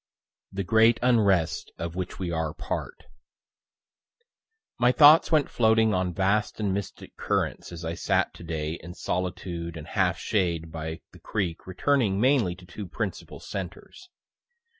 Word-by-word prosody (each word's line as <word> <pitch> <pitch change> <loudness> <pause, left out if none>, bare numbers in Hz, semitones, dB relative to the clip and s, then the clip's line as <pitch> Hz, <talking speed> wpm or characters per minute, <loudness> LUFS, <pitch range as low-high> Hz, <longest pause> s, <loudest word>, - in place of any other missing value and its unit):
THE 100 0 -3
GREAT 110 +4 +4
UNREST 100 -10 +2
OF 85 0 -5
WHICH 90 -1 -4
WE 90 -2 -3
ARE 80 -1 -2
PART - - -5 1.8
My 120 0 +5
thoughts 150 +5 +7
went 155 -3 +4
floating 110 -1 +3
on 90 -1 0
vast 100 +5 0
and 100 -3 0
mystic 100 -1 -6
currents - - -2
as 85 -1 -7
I 80 - -2
sat - - 0
to - - -12
day 80 -1 -3
in 90 0 -9
solitude 85 -2 -4
and 75 - -8
half 95 -1 +1
shade 85 -6 -1
by 80 0 -5
the - - -16
creek 95 -6 -3
returning 100 +1 +1
mainly 120 -7 +3
to 90 0 -15
two 95 +3 -8
principal - - -5
centres. 100 - -8
95 Hz, 145 wpm, -26 LUFS, 85-110 Hz, 1.8 s, thoughts